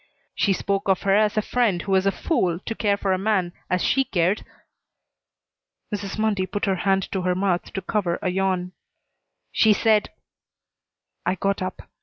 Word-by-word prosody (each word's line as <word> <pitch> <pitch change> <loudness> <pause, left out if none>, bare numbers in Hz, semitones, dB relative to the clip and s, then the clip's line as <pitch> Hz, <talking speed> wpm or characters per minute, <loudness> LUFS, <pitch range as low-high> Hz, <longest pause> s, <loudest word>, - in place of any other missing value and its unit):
"She 200 - +1
spoke 195 +1 -1
of 190 - +2
her 195 -1 +3
as 215 +1 +2
a 215 - +2
friend 225 -8 +1
who 195 - -4
was 190 0 +3
a - - +4
fool 185 - 0
to - - -2
care 205 -3 +1
for 195 -1 0
a 185 - 0
man 190 -4 0 0.2
as 180 -1 +1
she 270 - +3
cared." 185 -2 0 1.5
Mrs. 200 -1 -4
Mundy 210 -4 0
put 205 +2 -2
her 190 -1 +1
hand 195 +1 +1
to 190 - -1
her 180 0 0
mouth 185 -2 0
to 195 - -3
cover 185 -4 0
a 185 - -1
yawn. 185 -1 0 0.8
"She 220 -1 +5
said 215 0 +2 0.6
" - - -61
I 180 - +2
got 195 +2 -1
up. 185 - -4
195 Hz, 185 wpm, -24 LUFS, 185-210 Hz, 1.5 s, She